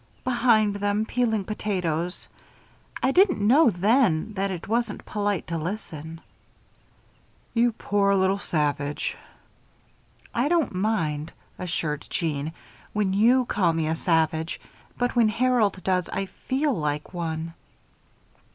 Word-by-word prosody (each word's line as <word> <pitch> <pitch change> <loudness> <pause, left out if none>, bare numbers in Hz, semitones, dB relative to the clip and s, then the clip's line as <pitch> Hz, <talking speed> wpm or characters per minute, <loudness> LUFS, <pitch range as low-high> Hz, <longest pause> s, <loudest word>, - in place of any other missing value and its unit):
"Behind 230 -5 +3
them, 205 +1 0
peeling 225 -4 0
potatoes. 180 -5 -2 0.8
I 260 - +4
didn't 365 - +4
know 250 +8 +5
then 210 -1 +2
that 195 0 -1
it 180 -3 -5
wasn't 235 +3 -1
polite 205 -3 -1
to 165 0 -3
listen." 165 -3 -6 1.3
"You 235 0 +3
poor 200 -2 +1
little 190 +1 +2
savage." 145 -4 -1 1.2
"I 240 +4 +1
don't 325 - +1
mind," 165 -7 -1 0.3
assured 160 -5 -3
Jeanne, 155 -2 -2 0.4
"when 205 -3 +1
you 240 +5 +4
call 180 -7 +1
me 160 -1 0
a 160 - +1
savage; 160 -1 0 0.4
but 245 +1 0
when 230 -3 +5
Harold 225 -5 +1
does, 180 -2 0
I 195 - -2
feel 270 +8 -1
like 150 -2 -3
one." 165 -1 -3
195 Hz, 120 wpm, -25 LUFS, 165-225 Hz, 1.3 s, know